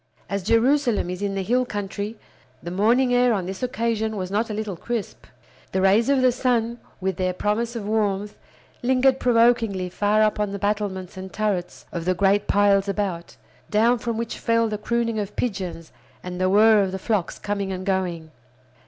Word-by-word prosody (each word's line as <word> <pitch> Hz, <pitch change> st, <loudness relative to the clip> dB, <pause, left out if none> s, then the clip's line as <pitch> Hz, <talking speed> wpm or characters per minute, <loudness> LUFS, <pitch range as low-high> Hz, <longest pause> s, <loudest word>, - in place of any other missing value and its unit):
As 200 Hz, 0 st, -1 dB
Jerusalem 230 Hz, -1 st, +2 dB
is 180 Hz, +1 st, -6 dB
in 200 Hz, -1 st, -1 dB
the 195 Hz, -, -1 dB
hill 245 Hz, +6 st, +2 dB
country, 205 Hz, -1 st, -5 dB, 0.5 s
the 175 Hz, -, -5 dB
morning 235 Hz, +7 st, +3 dB
air 245 Hz, -1 st, +4 dB
on 190 Hz, -4 st, -1 dB
this 190 Hz, +1 st, -6 dB
occasion 230 Hz, -3 st, -1 dB
was 185 Hz, -1 st, -4 dB
not 220 Hz, +3 st, 0 dB
a -, -, -3 dB
little 210 Hz, -3 st, -3 dB
crisp. 230 Hz, +4 st, -5 dB, 0.5 s
The 190 Hz, -, +1 dB
rays 210 Hz, +6 st, +4 dB
of 270 Hz, -2 st, +3 dB
the 255 Hz, -, +5 dB
sun, 240 Hz, -2 st, 0 dB, 0.2 s
with 190 Hz, -1 st, -2 dB
their 185 Hz, -1 st, 0 dB
promise 225 Hz, +5 st, -1 dB
of 210 Hz, -3 st, -4 dB
warmth, 210 Hz, -2 st, -1 dB, 0.5 s
lingered 260 Hz, +1 st, +3 dB
provokingly 230 Hz, -6 st, +2 dB
far 210 Hz, +3 st, +2 dB
up 215 Hz, 0 st, +1 dB
on 205 Hz, -1 st, -1 dB
the -, -, -3 dB
battlements 200 Hz, -2 st, -2 dB
and 190 Hz, 0 st, -7 dB
turrets 200 Hz, -4 st, -2 dB
of 170 Hz, -1 st, -4 dB
the 185 Hz, 0 st, +1 dB
great 200 Hz, +2 st, +2 dB
piles 200 Hz, -1 st, +3 dB
about, 195 Hz, -4 st, -3 dB, 0.3 s
down 230 Hz, +3 st, +3 dB
from 230 Hz, -1 st, -3 dB
which 230 Hz, 0 st, -4 dB
fell 230 Hz, -1 st, +2 dB
the 210 Hz, -1 st, -3 dB
crooning 230 Hz, 0 st, -1 dB
of 205 Hz, -1 st, -5 dB
pigeons 185 Hz, -8 st, -4 dB, 0.3 s
and 180 Hz, 0 st, -5 dB
the 185 Hz, -, +3 dB
whir 215 Hz, +2 st, +6 dB
of 190 Hz, -1 st, 0 dB
the 190 Hz, -, -3 dB
flocks 195 Hz, -1 st, -1 dB
coming 200 Hz, -1 st, -3 dB
and 185 Hz, 0 st, -5 dB
going. 180 Hz, -5 st, -2 dB
210 Hz, 190 wpm, -23 LUFS, 190-230 Hz, 0.5 s, whir